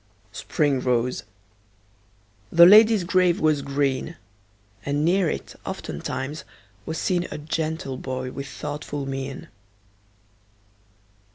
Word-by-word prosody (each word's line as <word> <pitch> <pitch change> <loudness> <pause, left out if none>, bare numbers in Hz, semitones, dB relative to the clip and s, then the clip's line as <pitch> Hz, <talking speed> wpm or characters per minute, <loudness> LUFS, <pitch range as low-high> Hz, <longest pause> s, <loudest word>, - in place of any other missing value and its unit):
Spring 140 +4 0
rose; 125 0 0 1.3
the 170 0 +8
lady's 215 +1 +7
grave 180 -1 +2
was 155 -2 +2
green; 140 +3 -1 0.7
And 145 +1 0
near 180 0 +3
it, - - -5
oftentimes, 140 +4 -5 0.4
was 160 - -3
seen 180 0 0
A - - -6
gentle 155 -2 -3
boy 130 -1 -4
with 140 +1 -6
thoughtful 145 0 -5
mien. 135 0 -5
145 Hz, 100 wpm, -24 LUFS, 135-170 Hz, 1.3 s, the